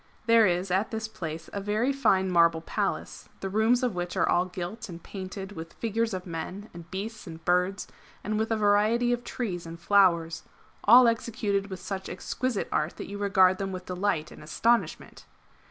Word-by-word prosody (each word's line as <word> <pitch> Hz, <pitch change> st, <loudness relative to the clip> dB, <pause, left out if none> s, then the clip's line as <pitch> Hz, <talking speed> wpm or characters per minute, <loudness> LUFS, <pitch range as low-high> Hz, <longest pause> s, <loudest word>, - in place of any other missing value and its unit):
There 230 Hz, -2 st, +6 dB
is 180 Hz, +1 st, -1 dB
at 190 Hz, +4 st, +1 dB
this 220 Hz, -1 st, -3 dB
place 165 Hz, -6 st, -6 dB
a 200 Hz, -, -3 dB
very 215 Hz, +7 st, 0 dB
fine 195 Hz, -8 st, +2 dB
marble 170 Hz, -2 st, +4 dB
Palace, -, -, -3 dB
the 195 Hz, -, -4 dB
rooms 225 Hz, +5 st, +3 dB
of 245 Hz, -4 st, +1 dB
which 175 Hz, 0 st, -4 dB
are -, -, +3 dB
all 175 Hz, +1 st, +3 dB
gilt 185 Hz, +5 st, -6 dB
and 170 Hz, -, -7 dB
painted 190 Hz, 0 st, -7 dB
with 165 Hz, -3 st, -8 dB
figures 230 Hz, 0 st, -1 dB
of 185 Hz, -, -6 dB
men 180 Hz, +5 st, -6 dB
and 170 Hz, 0 st, -11 dB
beasts 210 Hz, +3 st, -6 dB
and 165 Hz, -1 st, -10 dB
birds, 180 Hz, +3 st, +1 dB, 0.4 s
and 215 Hz, 0 st, -1 dB
with 220 Hz, -, 0 dB
a 225 Hz, -, +1 dB
variety 215 Hz, +4 st, +3 dB
of 240 Hz, 0 st, -3 dB
trees 180 Hz, -11 st, -4 dB
and 165 Hz, 0 st, -8 dB
flowers, 170 Hz, -3 st, +3 dB, 0.4 s
all 245 Hz, +3 st, +8 dB
executed 210 Hz, -3 st, -1 dB
with 190 Hz, -1 st, -6 dB
such 190 Hz, 0 st, -5 dB
exquisite 255 Hz, -5 st, -3 dB
art 155 Hz, +2 st, -1 dB
that -, -, -7 dB
you 200 Hz, 0 st, -6 dB
regard 190 Hz, -2 st, +4 dB
them 195 Hz, -1 st, -2 dB
with 185 Hz, -1 st, -6 dB
delight 180 Hz, -4 st, -1 dB
and -, -, -12 dB
astonishment. 230 Hz, +10 st, 0 dB
195 Hz, 185 wpm, -27 LUFS, 180-220 Hz, 0.4 s, all